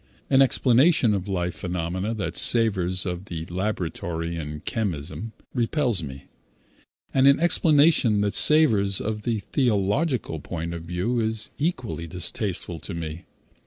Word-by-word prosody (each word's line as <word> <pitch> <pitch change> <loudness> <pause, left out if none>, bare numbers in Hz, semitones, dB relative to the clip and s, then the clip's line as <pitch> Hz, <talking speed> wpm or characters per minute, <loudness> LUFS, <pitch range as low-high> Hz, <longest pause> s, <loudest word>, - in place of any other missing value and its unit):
An 135 0 +5
explanation 130 -1 +3
of 100 -1 -3
life 90 -3 -2
phenomena 90 +5 -3
that 100 - -4
savors 95 -6 +3
of 90 +1 -4
the 80 -4 -6
laboratory 85 -3 -3
and 75 -1 -7
chemism 100 +1 -3 0.2
repels 120 - 0
me, 70 -3 -8 0.9
and 135 0 +4
an 140 0 +5
explanation 150 -9 +3
that 100 0 0
savors 110 -11 +4
of 105 0 -3
the 115 +1 -1
theological 120 - 0
point 85 +2 -5
of 85 -1 -7
view 90 +8 -2
is 110 -1 -2
equally 125 - -3
distasteful 90 0 -2
to 90 - -7
me. 85 +1 -6
100 Hz, 130 wpm, -24 LUFS, 85-120 Hz, 0.9 s, An